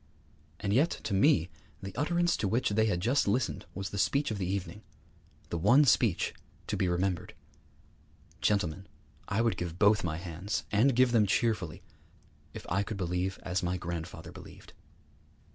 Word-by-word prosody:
And 100 Hz, -1 st, -1 dB
yet 145 Hz, +9 st, +4 dB
to 100 Hz, -, -3 dB
me 95 Hz, -, +3 dB, 0.3 s
the 95 Hz, 0 st, -7 dB
utterance 175 Hz, +5 st, +1 dB
to 100 Hz, -, -1 dB
which 115 Hz, +6 st, +1 dB
they 110 Hz, +1 st, +2 dB
had 90 Hz, -5 st, 0 dB
just 125 Hz, +6 st, +2 dB
listened 110 Hz, +3 st, -1 dB
was 95 Hz, 0 st, -4 dB
the 100 Hz, -, -3 dB
speech 140 Hz, +7 st, +1 dB
of 105 Hz, -, -3 dB
the 90 Hz, -, -2 dB
evening, 95 Hz, +1 st, -4 dB, 0.7 s
the 85 Hz, -, -2 dB
one 120 Hz, -, +5 dB
speech 115 Hz, -8 st, +2 dB, 0.3 s
to -, -, -2 dB
be 95 Hz, -, 0 dB
remembered: 90 Hz, -1 st, -1 dB, 1.1 s
'_Gentlemen, 95 Hz, -3 st, 0 dB, 0.4 s
I 100 Hz, -, 0 dB
would 115 Hz, -6 st, +1 dB
give 85 Hz, -1 st, -4 dB
both 105 Hz, +2 st, +4 dB
my 80 Hz, -3 st, -2 dB
hands, 90 Hz, +4 st, -4 dB
and 120 Hz, +5 st, +3 dB
give 125 Hz, 0 st, +4 dB
them 110 Hz, -4 st, +4 dB
cheerfully, 105 Hz, -6 st, 0 dB, 0.7 s
if -, -, -9 dB
I 95 Hz, +3 st, +1 dB
could 100 Hz, +1 st, -4 dB
believe 90 Hz, +1 st, -2 dB
as 90 Hz, +1 st, -1 dB
my 90 Hz, +1 st, -1 dB
grandfather 85 Hz, -1 st, -6 dB
believed! -, -, -13 dB
100 Hz, 165 wpm, -30 LUFS, 90-115 Hz, 1.1 s, one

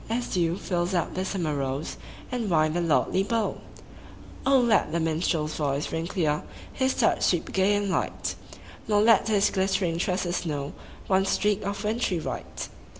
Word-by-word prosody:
As 240 Hz, +2 st, -1 dB
dew 170 Hz, -1 st, +1 dB
fills 180 Hz, -1 st, -1 dB
up 170 Hz, -, 0 dB
the 185 Hz, -, -2 dB
summer 175 Hz, -5 st, -2 dB
rose 135 Hz, +1 st, -3 dB, 0.3 s
And 240 Hz, -4 st, -2 dB
wine 155 Hz, -2 st, +3 dB
the 175 Hz, -, 0 dB
lordly 170 Hz, +3 st, +2 dB
bowl! 225 Hz, +2 st, -1 dB, 0.9 s
let 245 Hz, -, +4 dB
the 170 Hz, -, 0 dB
minstrePs 160 Hz, -1 st, 0 dB
voice 145 Hz, -1 st, -1 dB
ring 165 Hz, +1 st, -2 dB
clear. 155 Hz, -6 st, 0 dB, 0.3 s
His 260 Hz, -1 st, +1 dB
touch 230 Hz, -, +2 dB
sweep 175 Hz, -3 st, +1 dB
gay 190 Hz, +2 st, +3 dB
and 205 Hz, -1 st, 0 dB
light; -, -, -1 dB, 0.5 s
Nor 205 Hz, -1 st, +3 dB
let 230 Hz, 0 st, +5 dB
his 210 Hz, -2 st, +3 dB
glittering 190 Hz, -3 st, 0 dB
tresses 180 Hz, -2 st, -1 dB
know 145 Hz, -4 st, -3 dB, 0.3 s
One 190 Hz, 0 st, +2 dB
streak 205 Hz, +1 st, +1 dB
of 200 Hz, +2 st, -3 dB
wintry 210 Hz, -4 st, 0 dB
white. -, -, -5 dB
185 Hz, 160 wpm, -26 LUFS, 165-205 Hz, 0.9 s, let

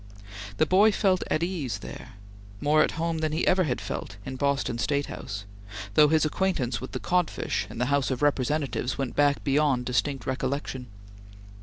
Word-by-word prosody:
The -, -, +4 dB
boy 200 Hz, +6 st, +5 dB
felt 190 Hz, -2 st, +2 dB
at 155 Hz, -, +1 dB
ease 155 Hz, -, -2 dB
there, 110 Hz, +4 st, -9 dB, 0.5 s
more 150 Hz, +3 st, +4 dB
at -, -, +2 dB
home 165 Hz, 0 st, -1 dB
than 155 Hz, -1 st, -1 dB
he 160 Hz, -, 0 dB
had -, -, +3 dB
ever 180 Hz, -9 st, +2 dB
felt 100 Hz, -, -6 dB
in 130 Hz, -, -5 dB
Boston 140 Hz, -3 st, 0 dB
State 140 Hz, +5 st, 0 dB
House, 100 Hz, 0 st, -6 dB, 0.5 s
though 150 Hz, +7 st, +7 dB
his 155 Hz, +1 st, +3 dB
acquaintance 150 Hz, -9 st, 0 dB
with 130 Hz, -, -7 dB
the -, -, -2 dB
codfish 180 Hz, -2 st, 0 dB
in -, -, -9 dB
the 125 Hz, -, +1 dB
House 140 Hz, -2 st, +2 dB
of 130 Hz, +1 st, -2 dB
Representatives 140 Hz, -2 st, 0 dB
went 135 Hz, -3 st, -3 dB
back 145 Hz, -1 st, +3 dB
beyond 140 Hz, -3 st, +2 dB
distinct 130 Hz, +1 st, -1 dB
recollection. 130 Hz, -1 st, -3 dB
140 Hz, 175 wpm, -27 LUFS, 130-155 Hz, 0.5 s, though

